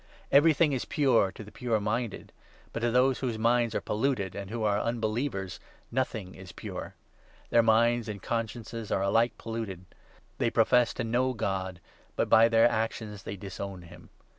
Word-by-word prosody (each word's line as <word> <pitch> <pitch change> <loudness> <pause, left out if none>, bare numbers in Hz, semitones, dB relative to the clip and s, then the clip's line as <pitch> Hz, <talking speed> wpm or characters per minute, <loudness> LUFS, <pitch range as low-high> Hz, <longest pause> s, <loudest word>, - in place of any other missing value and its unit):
Everything 155 +1 +5
is 130 - -1
pure 125 -9 +2
to 105 - -10
the 105 - -13
pure 120 -3 -1
15 105 - 0
minded, 110 +1 -3 0.4
but - - -2
to 120 +1 +1
those 125 +2 +3
whose 120 -4 -2
minds 115 0 +2
are - - 0
polluted 105 -4 -1
and 100 -1 -6
who 115 0 -3
are 105 -1 +2
unbelievers 110 -3 -2 0.3
nothing 110 -8 -2
is 95 -2 -11
pure. - - -7 0.6
Their 115 - +6
minds 115 +1 +3
and 100 -1 -5
consciences 115 +1 -4
are 95 - +1
alike 115 +4 +2
polluted. 110 -6 -5 0.5
They - - +2
profess 120 +1 +3
to 130 - -2
know 125 +3 +1
God, 95 -5 -3 0.4
but - - 0
by 115 +1 +7
their 115 0 +5
16 120 -2 +3
actions 110 -2 -5
they 100 - -6
disown 95 -1 -7
him. 85 +1 -14
115 Hz, 175 wpm, -29 LUFS, 100-120 Hz, 0.6 s, by